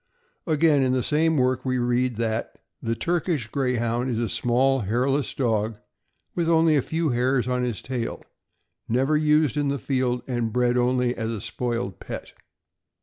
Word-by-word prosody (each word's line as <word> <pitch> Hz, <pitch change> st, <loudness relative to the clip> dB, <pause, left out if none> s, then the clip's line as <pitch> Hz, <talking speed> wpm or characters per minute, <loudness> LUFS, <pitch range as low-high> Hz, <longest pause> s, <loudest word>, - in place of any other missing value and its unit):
Again, 155 Hz, -2 st, +3 dB
in 130 Hz, -1 st, +2 dB
the 130 Hz, -1 st, +1 dB
same 160 Hz, +1 st, +2 dB
work, 130 Hz, -1 st, +1 dB
we 130 Hz, -1 st, 0 dB
read 125 Hz, 0 st, +1 dB
that 115 Hz, 0 st, -2 dB
' -, -, -59 dB
' -, -, -54 dB
the 115 Hz, 0 st, -1 dB
Turkish 165 Hz, -4 st, -1 dB
Greyhound 125 Hz, -2 st, 0 dB
is 120 Hz, -, -1 dB
a 115 Hz, 0 st, -1 dB
small 125 Hz, +4 st, +2 dB
sized 100 Hz, -5 st, -4 dB
hairless 135 Hz, +4 st, +1 dB
dog, 110 Hz, -4 st, 0 dB
or -, -, -28 dB, 0.5 s
with 170 Hz, -2 st, 0 dB
only 165 Hz, -1 st, +4 dB
a 140 Hz, -, +3 dB
few 160 Hz, +3 st, -1 dB
hairs 125 Hz, 0 st, +1 dB
on 125 Hz, 0 st, 0 dB
his 120 Hz, -4 st, -3 dB
tail; 125 Hz, -3 st, -4 dB, 0.7 s
never 135 Hz, +6 st, +2 dB
used 150 Hz, -1 st, +3 dB
in 145 Hz, -1 st, +1 dB
the 140 Hz, 0 st, 0 dB
field, 130 Hz, -3 st, -1 dB
and 120 Hz, -3 st, -1 dB
bred 125 Hz, +1 st, +2 dB
only 125 Hz, 0 st, +2 dB
as 115 Hz, -1 st, -3 dB
a 115 Hz, -2 st, -3 dB
spoiled 120 Hz, -4 st, -3 dB
pet." -, -, -7 dB
125 Hz, 185 wpm, -24 LUFS, 120-140 Hz, 0.7 s, only